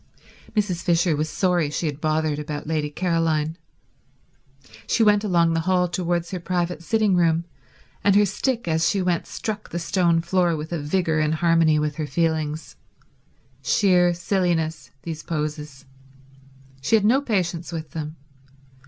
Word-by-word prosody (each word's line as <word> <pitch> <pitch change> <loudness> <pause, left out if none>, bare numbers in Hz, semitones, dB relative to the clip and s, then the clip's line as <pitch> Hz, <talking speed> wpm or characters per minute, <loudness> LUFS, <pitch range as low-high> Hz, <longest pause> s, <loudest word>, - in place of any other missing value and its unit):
Mrs. 195 -5 0
Fisher 170 -1 +2
was 155 +2 -2
sorry 175 -5 +1
she 150 - -3
had 150 -1 -3
bothered 155 -1 0
about 150 0 -5
Lady 155 -1 -1
Caroline. 165 -1 0 1.3
She 230 - +2
went 210 -1 +4
along 170 -5 +2
the 165 - +1
hall 180 -1 +3
towards 175 -1 -2
her 185 - -3
private 175 -1 -2
sitting 210 +1 +2
room, 170 -1 +2 0.6
and 200 0 +4
her 205 0 +6
stick 235 +3 -2
as 160 -1 +2
she 200 - 0
went 180 -2 0
struck 210 -1 -5
the - - -4
stone 170 -1 +2
floor 175 -1 +1
with 155 +2 -6
a 170 - -2
vigour 160 +1 0
in 155 0 +1
harmony 165 -1 +3
with 150 0 -1
her 155 -2 -2
feelings. 160 +1 -1 0.9
Sheer 180 -3 +3
silliness, 170 -3 -1
these 160 -2 -5
poses. 150 -3 -4 1.0
She 145 +11 +2
had 210 -2 +3
no 255 +6 +4
patience 180 -9 -2
with 160 -4 -6
them. 155 0 -5
170 Hz, 155 wpm, -23 LUFS, 155-180 Hz, 1.3 s, her